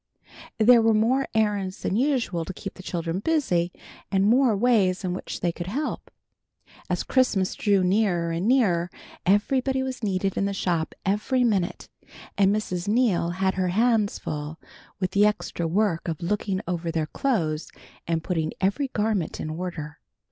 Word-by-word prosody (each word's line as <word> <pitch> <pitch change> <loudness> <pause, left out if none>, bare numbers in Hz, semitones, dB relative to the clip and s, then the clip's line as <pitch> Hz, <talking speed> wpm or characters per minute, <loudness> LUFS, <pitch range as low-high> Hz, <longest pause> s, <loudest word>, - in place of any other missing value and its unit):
There 230 +2 +6
were 225 -1 +3
more 250 +5 +2
errands 205 -4 0
than - - 0
usual 245 - 0
to 190 - -6
keep 195 - -7
the - - -12
children 170 -1 -3
busy, 195 - +1 0.4
and 195 0 +3
more 235 0 +4
ways 200 -5 +2
in 180 -1 -1
which 185 - -6
they 175 - +1
could 175 +1 -7
help. 280 +10 -3 0.8
As - - 0
Christmas 215 -8 +1
drew 200 -3 +2
nearer 180 -3 +1
and 170 +5 -1
nearer 190 -10 +3 0.4
somebody 260 +7 +2
was 260 -2 -5
needed 195 -2 -1
in 195 - +1
the 200 0 -2
shop 170 -4 -1
every 215 +6 +1
minute, 200 -7 0 0.5
and 195 -1 +4
Mrs. 195 -3 -2
Neal 210 -6 +2
had 190 +2 0
her 185 -1 0
hands 220 +2 +2
full 150 +1 -5 0.4
with 185 -1 -1
the 205 +2 +5
extra 175 -5 -2
work 180 -1 0
of 160 -3 -3
looking 195 +1 -1
over 170 -1 -2
their 160 -1 -1
clothes 160 - -1 0.4
and 165 -1 -1
putting 160 -3 -1
every 200 +10 +1
garment 210 -7 -1
in 155 - -4
order. 160 -3 -6
195 Hz, 160 wpm, -25 LUFS, 175-225 Hz, 0.8 s, There